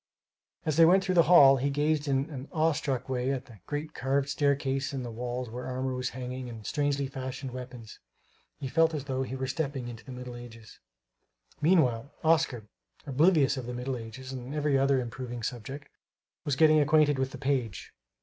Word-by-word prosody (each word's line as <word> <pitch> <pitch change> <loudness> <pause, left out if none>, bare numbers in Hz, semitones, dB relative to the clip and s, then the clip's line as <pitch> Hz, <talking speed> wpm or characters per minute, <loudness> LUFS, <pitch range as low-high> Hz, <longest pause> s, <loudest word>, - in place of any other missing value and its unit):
As 155 -1 0
they 165 - +8
went 190 +3 +5
through 185 -1 0
the 175 - +6
hall, 140 -6 +8
he 135 +2 0
gazed 145 +1 0
in 135 +1 +1
an 135 -1 -7
awe 160 -1 +2
stricken 135 -3 -2
way 125 +1 -1
at 135 -2 -3
the 110 -4 -15
great 150 +1 -4
carved 135 +2 0
staircase 140 -1 0
and 130 -2 -3
the 120 - -5
walls 125 +2 -4
where 120 +3 -6
armor 130 0 -2
was 125 0 -2
hanging 125 0 -6
and 110 -3 -9
strangely 145 -1 0
fashioned 130 0 -6
weapons. 125 -3 -9 0.6
He 140 - -5
felt 165 +3 +3
as 145 - -3
though 130 -2 -2
he 130 0 -3
were 130 0 -3
stepping 135 -2 -3
into 115 -2 -8
the 130 - -10
Middle 125 -1 -7
Ages. 115 -2 -12 0.8
Meanwhile, 140 -7 +3
Oscar, 160 -7 +2 0.4
oblivious 145 0 +3
of 125 -2 -5
the 125 - -4
Middle 125 +2 -3
Ages 125 +3 -8
and 130 +2 -6
every 150 -2 +1
other 135 0 +3
improving 120 -1 -5
subject, 135 +5 -5 0.6
was 145 - 0
getting 155 +2 +5
acquainted 150 -1 +4
with 130 0 0
the - - -9
page. 130 -8 -2
135 Hz, 190 wpm, -29 LUFS, 125-145 Hz, 0.8 s, they